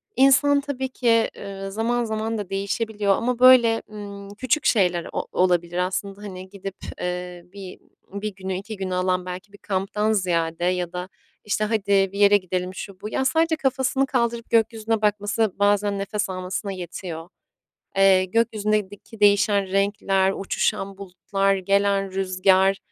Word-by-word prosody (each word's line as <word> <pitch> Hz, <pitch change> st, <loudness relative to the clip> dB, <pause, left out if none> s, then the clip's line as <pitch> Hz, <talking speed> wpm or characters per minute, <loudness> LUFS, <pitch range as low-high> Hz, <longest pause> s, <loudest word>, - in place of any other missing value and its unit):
insan 275 Hz, +2 st, +5 dB
tabii 265 Hz, -2 st, -4 dB
ki, 230 Hz, -3 st, +2 dB
ııı, 195 Hz, -1 st, -7 dB
zaman 235 Hz, +3 st, 0 dB
zaman 220 Hz, 0 st, -2 dB
da 200 Hz, -2 st, -5 dB
değişebiliyor 200 Hz, +1 st, 0 dB
ama, 245 Hz, +3 st, -1 dB
böyle, 245 Hz, -3 st, +6 dB
ımm, 200 Hz, -1 st, -9 dB
küçük 260 Hz, +4 st, 0 dB
şeyler 180 Hz, -6 st, +2 dB
o -, -, -3 dB
olabilir 175 Hz, -1 st, +1 dB
aslında. 195 Hz, +2 st, -2 dB
Hani, 190 Hz, -2 st, -8 dB
gidip, 195 Hz, -1 st, -8 dB, 0.3 s
eee, 180 Hz, 0 st, -4 dB
bi 195 Hz, -2 st, -9 dB, 0.3 s
bir 200 Hz, 0 st, -4 dB
günü, 190 Hz, 0 st, -5 dB
2 215 Hz, +2 st, -7 dB
günü 190 Hz, -1 st, -3 dB
alan 185 Hz, 0 st, 0 dB
belki 185 Hz, +2 st, -8 dB
bir 205 Hz, -, -13 dB
kamptan 200 Hz, +3 st, -1 dB
ziyade 170 Hz, -4 st, 0 dB
ya 180 Hz, -1 st, -1 dB
da, 180 Hz, +1 st, -5 dB, 0.4 s
işte, 210 Hz, +1 st, 0 dB
hadi 215 Hz, -1 st, -1 dB, 0.3 s
bir 200 Hz, -, -6 dB
yere 205 Hz, 0 st, +6 dB
gidelim 185 Hz, 0 st, -4 dB
şu 195 Hz, 0 st, -8 dB
bu, 210 Hz, -, -5 dB
ya 265 Hz, -, -1 dB
sadece 320 Hz, +4 st, +2 dB
kafasını 265 Hz, -1 st, 0 dB
kaldırıp 235 Hz, -3 st, -1 dB
gökyüzüne 225 Hz, -1 st, +1 dB
bakması 210 Hz, +1 st, +1 dB
bazen 205 Hz, 0 st, +2 dB
nefes 205 Hz, +1 st, -2 dB
almasına 185 Hz, +2 st, -4 dB
yetiyor. 175 Hz, -2 st, -7 dB, 0.7 s
Eee, 190 Hz, -1 st, +5 dB
gökyüzündeki 215 Hz, 0 st, -1 dB
değişen 205 Hz, -1 st, +4 dB
renkler, 195 Hz, -1 st, +1 dB
uçuşan 195 Hz, 0 st, -2 dB
bulutlar, 195 Hz, +1 st, -1 dB
gelen 195 Hz, 0 st, +1 dB
rüzgar, 190 Hz, 0 st, +2 dB
200 Hz, 145 wpm, -23 LUFS, 185-220 Hz, 0.7 s, böyle